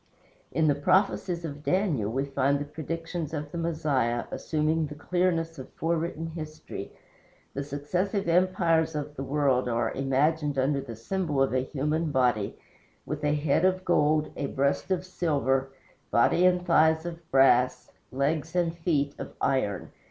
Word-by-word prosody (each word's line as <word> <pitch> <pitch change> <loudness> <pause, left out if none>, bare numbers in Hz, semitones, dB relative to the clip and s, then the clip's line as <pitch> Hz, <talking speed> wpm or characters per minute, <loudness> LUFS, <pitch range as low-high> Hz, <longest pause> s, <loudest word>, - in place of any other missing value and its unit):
In 160 -1 +2
the 145 - +5
prophecies 175 +3 +1
of 145 -2 -6
Daniel 155 - +1
we 135 +3 -1
find 140 0 +1
the 145 - -4
predictions 165 +1 -5
of 150 0 -5
the 170 - -5
Messiah 145 -8 0
assuming 155 0 0
the 150 - -8
clearness 165 -1 0
of 130 - -8
forewritten 165 0 -2
history. 155 -1 -7 0.6
The 140 - -3
successive 175 +8 -2
empires 165 -2 +2
of 150 0 -4
the - - -5
world 135 -2 +1
are 115 -1 0
imaged 145 +2 +1
under 140 +1 +1
the 120 -4 -8
symbol 150 - -2
of 135 -1 +2
a 130 - +3
human 150 +5 -1
body, 125 -7 +1 0.5
with 150 +2 -5
a 150 0 +2
head 145 +2 +1
of 185 0 +2
gold, 155 -2 +2
a 140 - -2
breast 140 +6 0
of 185 -1 0
silver, 140 -7 0 0.4
body 175 +9 +4
and 180 -1 +1
thighs 160 -1 +4
of 170 -1 -5
brass, 130 -2 +3 0.2
legs 150 +5 -1
and 170 -2 +1
feet 150 -4 0
of - - -7
iron. 105 -8 0
150 Hz, 155 wpm, -27 LUFS, 135-165 Hz, 0.6 s, the